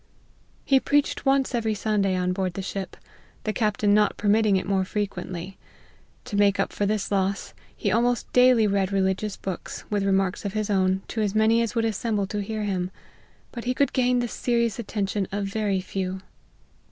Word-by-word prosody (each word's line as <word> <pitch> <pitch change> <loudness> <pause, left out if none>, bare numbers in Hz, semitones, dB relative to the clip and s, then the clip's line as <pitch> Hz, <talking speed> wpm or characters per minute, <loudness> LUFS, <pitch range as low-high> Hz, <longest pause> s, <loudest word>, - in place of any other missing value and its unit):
He 270 -1 +5
preached 290 0 0
once 270 -1 +2
every 225 -2 0
Sunday 200 -2 +1
on 180 0 0
board 185 -1 -2
the 195 - -4
ship, 195 0 -5 0.5
the 215 - -1
captain 210 -2 +1
not 210 0 +3
permitting 210 0 +3
it - - -2
more 190 -1 +1
frequently. 190 -2 -4 0.7
To - - -5
make 205 -1 +3
up - - 0
for 205 - 0
this 210 -1 -1
loss, 195 0 -1 0.2
he - - 0
almost 240 +1 +1
daily 250 -3 +6
read 200 -1 +1
re 195 -1 +2
ligious 190 +2 -1
books, 190 -2 -6
with 205 -1 +1
remarks 195 -1 +1
of 200 -2 -3
his 215 -1 -1
own, 190 -1 +2
to 225 - -2
as 205 -1 -1
many 220 +2 +4
as 230 0 -2
would 230 -1 +1
assemble 215 -1 -1
to 205 +2 -3
hear 215 +1 -3
him; 185 -3 -1 0.6
but 235 -1 -7
he 250 +1 0
could 280 - +1
gain 250 -1 +2
the 245 0 0
serious 235 -2 0
attention 205 -3 -2
of 200 0 -2
very 200 -1 -1
few. 190 0 -4
205 Hz, 190 wpm, -25 LUFS, 195-225 Hz, 0.7 s, daily